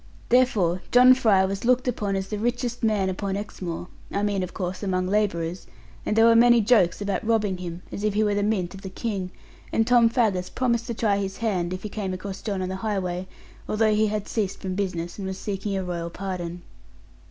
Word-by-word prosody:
Therefore 210 -8 +3
John 250 +1 +8
Fry 215 -7 +4
was 195 +1 -3
looked 250 +1 +2
upon 210 -5 -1
as 190 0 -3
the 210 - -3
richest 240 +1 -2
man 215 -4 +2
upon 195 +1 -2
Exmoor, 180 -4 -5 0.2
I 200 - -1
mean 205 -2 0
of 180 -1 -4
course 185 0 -4
among 185 -2 0
labourers, 185 -4 -1 0.4
and 210 - +1
there 225 0 +6
were 230 0 +6
many 240 +1 +6
jokes 210 -5 +3
about 200 -1 -1
robbing 215 -4 +1
him, 175 -1 -7
as 200 - -5
if 210 -1 0
he 215 - +3
were 210 -1 +1
the 205 - 0
mint 200 -4 0
of 195 - -10
the 190 - -6
King; 195 -2 -3 0.4
and 225 - +2
Tom 240 -1 +5
Faggus 210 -7 +1
promised 235 -2 0
to 235 - -3
try 210 -3 +1
his 195 -1 -4
hand, 185 -6 -1
if 185 0 -5
he 210 - -4
came 195 -3 -3
across 195 +1 -7
John 200 -4 -2
on 185 - -3
the 190 - -3
highway, 190 -3 -2 0.4
although 215 0 +2
he 215 +1 +3
had 210 -1 -3
ceased 200 -4 -2
from 190 -2 -4
business, 180 -2 -3
and 195 - -4
was 190 0 -4
seeking 200 0 -3
a 190 - -2
Royal 170 -2 -4
pardon. 175 -1 -5
200 Hz, 220 wpm, -25 LUFS, 185-220 Hz, 0.4 s, John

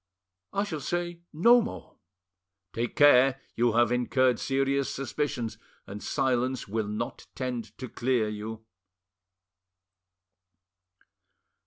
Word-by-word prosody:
"I 200 - 0
shall 165 -7 -4
say 175 +3 -3
no 235 +10 +6
more." 230 - -7 0.8
"Take 120 +1 -3
care! 135 -2 +6 0.2
you 120 -1 +2
have 120 0 +3
incurred 125 0 +2
serious 135 0 0
suspicions, 135 -4 -3 0.3
and 105 +1 -8
silence 130 +2 0
will 110 +1 -2
not 105 +1 -5
tend 120 -5 -4
to 130 - -6
clear 120 -2 0
you." 110 +1 -6
125 Hz, 105 wpm, -28 LUFS, 115-140 Hz, 0.8 s, no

